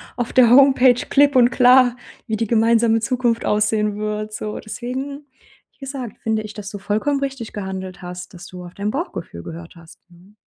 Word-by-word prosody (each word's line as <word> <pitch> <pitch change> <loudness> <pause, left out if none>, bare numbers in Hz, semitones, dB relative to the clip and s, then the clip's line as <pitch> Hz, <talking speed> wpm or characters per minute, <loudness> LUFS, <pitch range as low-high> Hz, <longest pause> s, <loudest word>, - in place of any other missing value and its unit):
auf 240 -2 -3
der 245 -3 +5
Homepage 260 -1 +6 0.2
klipp 285 -1 +4
und 245 -1 +6
klar, 250 0 +5 0.3
wie 220 -2 -2
die 230 - -1
gemeinsame 225 0 +3
Zukunft 240 0 -1
aussehen 210 0 +1
wird, 215 0 -4
so. 215 0 -5
Deswegen, 265 +6 -6 0.5
wie - - -40
gesagt, 270 -5 -7
finde 220 -1 -1
ich, 215 0 -9
dass 205 -1 -7
du 205 - -7
vollkommen 215 +8 -1
richtig 270 -5 -5
gehandelt 190 -2 -6
hast, 180 +1 -8
dass 180 +3 -11
du 180 -2 -10
auf 175 0 -12
dein 205 +1 -2
Bauchgefühl 180 - -5
gehört 165 - -10
hast, 165 -1 -16
mhm. 185 +5 -20
220 Hz, 185 wpm, -20 LUFS, 200-250 Hz, 0.5 s, Homepage